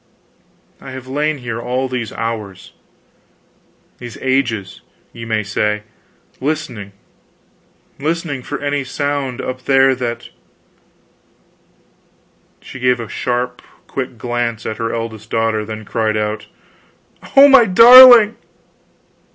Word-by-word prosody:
I -, -, -10 dB
have 130 Hz, -1 st, -9 dB
lain 150 Hz, +3 st, -2 dB
here 120 Hz, -3 st, -6 dB
all 125 Hz, +2 st, -2 dB
these 125 Hz, -4 st, -5 dB
hours 105 Hz, -5 st, -6 dB, 1.3 s
these 120 Hz, -2 st, -9 dB
ages, 120 Hz, -7 st, -2 dB, 0.3 s
ye 115 Hz, -1 st, -9 dB
may 110 Hz, -1 st, -1 dB
say 105 Hz, +1 st, -2 dB, 0.6 s
listening, 130 Hz, -9 st, -4 dB, 1.1 s
listening 155 Hz, -2 st, -3 dB
for -, -, -6 dB
any 145 Hz, 0 st, -2 dB
sound 140 Hz, -1 st, -3 dB
up 130 Hz, 0 st, -7 dB
there 135 Hz, -1 st, +4 dB
that 120 Hz, -2 st, -5 dB, 1.2 s
" -, -, -39 dB
She 130 Hz, -, -11 dB
gave 125 Hz, 0 st, +1 dB
a 115 Hz, -, -6 dB
sharp 125 Hz, +2 st, -3 dB, 0.2 s
quick 130 Hz, -2 st, -6 dB
glance 120 Hz, -1 st, -3 dB
at 110 Hz, -, -4 dB
her 115 Hz, 0 st, -3 dB
eldest 115 Hz, -1 st, -6 dB
daughter, 115 Hz, -1 st, -1 dB
then 110 Hz, 0 st, -8 dB
cried 110 Hz, -1 st, -1 dB
out, 105 Hz, 0 st, -3 dB, 0.9 s
"Oh, 275 Hz, +1 st, +10 dB
my 270 Hz, -4 st, +6 dB
darling!" 235 Hz, +2 st, +8 dB
125 Hz, 115 wpm, -17 LUFS, 110-140 Hz, 1.3 s, Oh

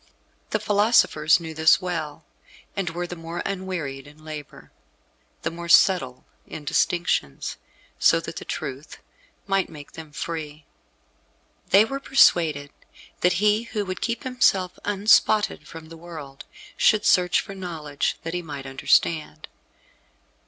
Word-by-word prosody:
The 215 Hz, -, 0 dB
philosophers 205 Hz, -7 st, +3 dB
knew 160 Hz, -1 st, -7 dB
this 160 Hz, +2 st, +5 dB
well, 165 Hz, -4 st, -5 dB, 0.5 s
and 195 Hz, -3 st, -1 dB
were 175 Hz, +2 st, -4 dB
the 175 Hz, -, -7 dB
more 165 Hz, +1 st, -6 dB
unwearied 180 Hz, -8 st, -4 dB
in 150 Hz, +1 st, -17 dB
labour, 150 Hz, -2 st, -9 dB, 0.7 s
the -, -, -1 dB
more 170 Hz, +1 st, -8 dB
subtle 150 Hz, -9 st, +4 dB, 0.2 s
in 150 Hz, -, -8 dB
distinctions, 165 Hz, -, 0 dB, 0.4 s
so 165 Hz, -, +5 dB
that 165 Hz, -, -8 dB
the -, -, -6 dB
truth 140 Hz, 0 st, -6 dB, 0.5 s
might 195 Hz, -1 st, 0 dB
make 150 Hz, -3 st, -11 dB
them 160 Hz, -2 st, -11 dB
free. 155 Hz, -1 st, -6 dB, 1.0 s
They 200 Hz, +3 st, +6 dB
were 275 Hz, +4 st, -4 dB
persuaded 160 Hz, -, +3 dB, 0.5 s
that 180 Hz, 0 st, +3 dB
he 210 Hz, +4 st, +2 dB
who 210 Hz, -3 st, -3 dB
would 185 Hz, -1 st, -5 dB
keep 235 Hz, +2 st, -2 dB
himself 200 Hz, -8 st, +1 dB
unspotted 205 Hz, +1 st, +3 dB
from 160 Hz, -1 st, -11 dB
the 165 Hz, -, -11 dB
world 155 Hz, -5 st, -10 dB, 0.3 s
should 215 Hz, -1 st, +3 dB
search 180 Hz, -3 st, +4 dB
for 195 Hz, -, -6 dB
knowledge, 160 Hz, -6 st, -3 dB
that 165 Hz, -, -5 dB
he 180 Hz, -, -2 dB
might 145 Hz, -5 st, -8 dB
understand. 150 Hz, +4 st, 0 dB
170 Hz, 135 wpm, -24 LUFS, 150-195 Hz, 1.0 s, They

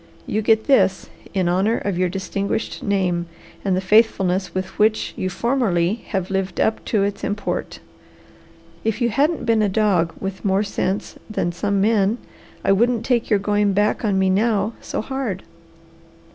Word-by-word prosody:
"You 215 Hz, -, -1 dB
get 220 Hz, 0 st, +3 dB
this 190 Hz, -9 st, +2 dB, 0.2 s
in 190 Hz, -3 st, 0 dB
honour 195 Hz, +6 st, +2 dB
of 200 Hz, -3 st, -2 dB
your 180 Hz, 0 st, +1 dB
distinguished 195 Hz, +3 st, -3 dB
name 180 Hz, -4 st, 0 dB, 0.4 s
and 190 Hz, -2 st, +1 dB
the -, -, 0 dB
faithfulness 190 Hz, -2 st, +3 dB
with 185 Hz, 0 st, -5 dB
which 215 Hz, +1 st, +2 dB
you 185 Hz, -, -2 dB
formerly 205 Hz, -6 st, +1 dB
have 190 Hz, -2 st, -2 dB
lived 190 Hz, -2 st, -2 dB
up 220 Hz, -, +1 dB
to 210 Hz, -3 st, +1 dB
its 200 Hz, 0 st, -3 dB
import. 205 Hz, 0 st, -3 dB, 1.1 s
If 220 Hz, 0 st, -1 dB
you 240 Hz, -2 st, +2 dB
hadn't 290 Hz, +8 st, +1 dB
been 225 Hz, -2 st, +3 dB
a 210 Hz, -, +2 dB
dog 190 Hz, -5 st, +2 dB
with 195 Hz, 0 st, -5 dB
more 195 Hz, 0 st, +2 dB
sense 200 Hz, -1 st, -3 dB
than 190 Hz, -5 st, -1 dB
some 200 Hz, +3 st, -1 dB
men, 210 Hz, +1 st, +2 dB, 0.5 s
I -, -, +4 dB
wouldn't 230 Hz, +3 st, +2 dB
take 240 Hz, -3 st, +1 dB
your 210 Hz, -, +4 dB
going 205 Hz, 0 st, +1 dB
back 205 Hz, +4 st, +1 dB
on 205 Hz, -3 st, +1 dB
me 190 Hz, 0 st, +3 dB
now 210 Hz, +1 st, +1 dB
so -, -, -3 dB
hard. 235 Hz, -6 st, -4 dB
200 Hz, 165 wpm, -21 LUFS, 190-220 Hz, 1.1 s, I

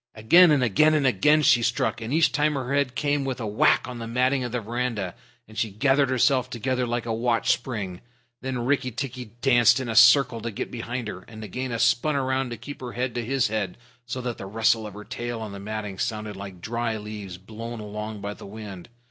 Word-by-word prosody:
Again 170 Hz, +12 st, +6 dB
and 145 Hz, -4 st, +3 dB
again 155 Hz, +8 st, +4 dB
and 145 Hz, -3 st, +2 dB
again 150 Hz, +6 st, +4 dB
she 130 Hz, -5 st, +5 dB
struck, 120 Hz, 0 st, 0 dB
and 115 Hz, +2 st, -5 dB
each 160 Hz, +2 st, +4 dB
time 150 Hz, 0 st, +1 dB
her 135 Hz, 0 st, -3 dB
head 140 Hz, -3 st, +1 dB
came 145 Hz, +4 st, 0 dB
with 130 Hz, -2 st, -3 dB
a 115 Hz, -, -3 dB
whack 105 Hz, 0 st, +3 dB
on 125 Hz, -1 st, -7 dB
the 115 Hz, -, -5 dB
matting 130 Hz, +3 st, +1 dB
of 120 Hz, -, -4 dB
the 125 Hz, -, -1 dB
veranda 115 Hz, -4 st, -3 dB, 0.3 s
and 110 Hz, -, -15 dB
she 110 Hz, -, 0 dB
gathered 135 Hz, +6 st, +2 dB
herself 130 Hz, 0 st, +2 dB
together 125 Hz, +1 st, -1 dB
like 120 Hz, 0 st, -2 dB
a 115 Hz, -, -1 dB
watch 115 Hz, 0 st, +1 dB
spring. 100 Hz, -8 st, -3 dB, 0.4 s
Then 125 Hz, -2 st, -3 dB
Rikki 130 Hz, -1 st, +1 dB
tikki 125 Hz, +1 st, -5 dB, 0.2 s
danced 120 Hz, -2 st, +5 dB
in 130 Hz, -, -4 dB
a 115 Hz, -, -3 dB
circle 120 Hz, 0 st, +6 dB
to 115 Hz, -, -3 dB
get 105 Hz, -, -5 dB
behind 120 Hz, 0 st, -4 dB
her, 95 Hz, -3 st, -6 dB
and 110 Hz, -2 st, -11 dB
Nagaina 115 Hz, +3 st, -4 dB
spun 145 Hz, +6 st, +2 dB
round 130 Hz, -1 st, 0 dB
to 120 Hz, -, -6 dB
keep 145 Hz, -2 st, -9 dB
her 125 Hz, -2 st, -6 dB
head 125 Hz, 0 st, -2 dB
to 120 Hz, 0 st, -2 dB
his 130 Hz, 0 st, +1 dB
head, 105 Hz, -4 st, -2 dB, 0.3 s
so 125 Hz, +1 st, -4 dB
that 120 Hz, -2 st, -4 dB
the 95 Hz, -, -6 dB
rustle 110 Hz, +1 st, +1 dB
of 105 Hz, -, -10 dB
her 105 Hz, -, -8 dB
tail 120 Hz, +1 st, -5 dB
on 110 Hz, -2 st, -6 dB
the 100 Hz, -, -8 dB
matting 105 Hz, -1 st, -5 dB
sounded 105 Hz, -1 st, -3 dB
like 95 Hz, -2 st, -9 dB
dry 115 Hz, 0 st, -2 dB
leaves 105 Hz, -3 st, -7 dB
blown 115 Hz, +4 st, -8 dB
along 105 Hz, 0 st, -6 dB
by 100 Hz, +1 st, -4 dB
the -, -, -11 dB
wind. 100 Hz, -3 st, -9 dB
120 Hz, 225 wpm, -25 LUFS, 110-130 Hz, 0.4 s, Again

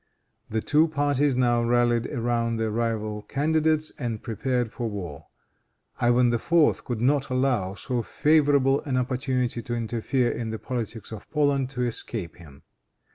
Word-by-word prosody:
The 110 Hz, 0 st, -1 dB
two 155 Hz, +2 st, +4 dB
parties 145 Hz, -2 st, +1 dB
now 120 Hz, -2 st, +2 dB
rallied 120 Hz, 0 st, +2 dB
around 115 Hz, -2 st, -1 dB
their 110 Hz, -1 st, -1 dB
rival 110 Hz, -2 st, -2 dB
candidates 155 Hz, +4 st, +1 dB
and 120 Hz, -5 st, -3 dB
prepared 120 Hz, 0 st, -1 dB
for 120 Hz, -1 st, -3 dB
war. 90 Hz, -9 st, -7 dB, 0.7 s
Ivan 120 Hz, 0 st, +3 dB
IV. 160 Hz, +7 st, +2 dB
could 120 Hz, -3 st, -3 dB
not 135 Hz, +2 st, +2 dB
allow 125 Hz, -7 st, 0 dB
so 125 Hz, +2 st, -2 dB
favorable 145 Hz, -1 st, +3 dB
an 135 Hz, -4 st, -2 dB
opportunity 125 Hz, -1 st, -1 dB
to 120 Hz, +1 st, -4 dB
interfere 120 Hz, +2 st, 0 dB
in 115 Hz, -2 st, -4 dB
the 110 Hz, -, -3 dB
politics 115 Hz, -3 st, -5 dB
of 110 Hz, -2 st, -9 dB
Poland 140 Hz, -3 st, +1 dB
to 125 Hz, -2 st, -3 dB
escape 110 Hz, -6 st, -4 dB
him. 75 Hz, -4 st, -15 dB
120 Hz, 145 wpm, -25 LUFS, 115-135 Hz, 0.7 s, two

